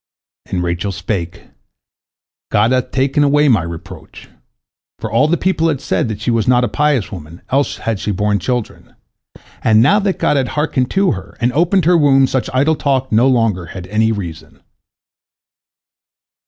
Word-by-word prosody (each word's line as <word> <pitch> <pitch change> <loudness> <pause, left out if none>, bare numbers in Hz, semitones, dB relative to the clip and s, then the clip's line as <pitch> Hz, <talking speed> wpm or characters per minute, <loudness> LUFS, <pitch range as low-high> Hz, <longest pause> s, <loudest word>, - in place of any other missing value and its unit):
And 90 -1 -2
Rachel 85 +3 -2
spake, 85 -1 -4 1.1
"God 105 +4 +2
hath 125 0 0
taken 135 +3 +1
away 145 +1 +3
my 110 -8 +3
reproach," 85 +3 -10 0.7
for 110 - -6
all 115 +7 +3
the 170 +2 +1
people 170 -3 0
had 150 -5 0
said - - -1
that 110 -2 -5
she 110 - -1
was 115 -2 0
not 125 0 +4
a - - +1
pious 145 -8 0
woman, 85 -2 -10
else 140 +2 0
had 115 -3 -3
she - - -4
borne 105 +1 0
children, 125 +3 -4 0.7
and 110 -1 +4
now 190 - +4
that 200 -2 -1
God 145 - +1
had 130 -2 0
hearkened 140 -4 0
to 195 -1 +2
her, 95 -1 -7
and 120 +2 0
opened 175 +3 +2
her 175 0 +4
womb, 135 -2 +4
such 130 -1 -2
idle 145 +5 +2
talk 135 -3 -1
no 115 +4 +4
longer 115 -9 +1
had 90 +1 -8
any 110 +4 +1
reason. 85 -7 -7
120 Hz, 170 wpm, -16 LUFS, 100-145 Hz, 1.1 s, not